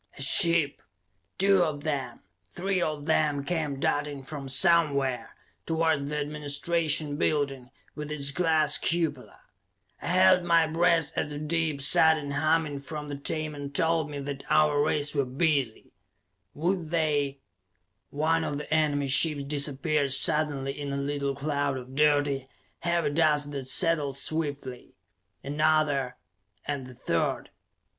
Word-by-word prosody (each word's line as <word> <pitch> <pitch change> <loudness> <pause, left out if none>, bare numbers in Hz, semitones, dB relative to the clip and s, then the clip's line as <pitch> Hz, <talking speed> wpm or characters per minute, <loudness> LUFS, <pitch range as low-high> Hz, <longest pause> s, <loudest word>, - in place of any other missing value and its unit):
A - - -8
ship, 165 +1 +4 0.6
two 195 -1 +3
of 150 -4 -2
them, 135 -6 -4 0.3
three 185 - -2
of 150 -3 -3
them 150 -3 +1
came 150 -3 -3
darting 145 -1 -2
from 140 -1 -7
somewhere, 140 -5 +2 0.3
towards 160 -3 0
the 150 +1 -4
administration 150 +1 -1
building, 140 -5 -1 0.2
with 150 0 -7
its 140 -2 0
glass 160 -2 +2
cupola. 160 -6 -2 0.6
I - - -6
held 185 +1 +4
my 170 -1 +3
breath 165 -1 +1
as - - -2
the 145 - -6
deep, 155 -2 -2
sudden 155 0 +4
humming 155 0 0
from 150 +1 -7
the 145 - -4
Tamon 145 -1 -4
told 160 0 +1
me 145 - -6
that 140 0 -6
our 150 -1 +3
rays 150 -1 0
were 140 -2 +1
busy. 135 -2 -1 0.6
Would 170 +1 -2
they 145 -4 -1 0.7
One 160 +3 0
of 145 -2 -3
the 150 +1 -5
enemy 150 -2 +1
ships 140 +2 +4
disappeared 140 0 +1
suddenly 145 -2 +2
in 145 -1 -4
a 140 - -3
little 140 0 -2
cloud 140 -1 -2
of 130 0 -10
dirty, 145 -2 +1 0.3
heavy 170 -3 0
dust 150 -2 +1
that 135 -3 -5
settled 150 -2 +2
swiftly. 145 -4 -4 0.5
Another... 145 -3 0 0.5
and 140 -3 -4
the 125 - -13
third. - - -2
150 Hz, 135 wpm, -27 LUFS, 140-160 Hz, 0.7 s, ship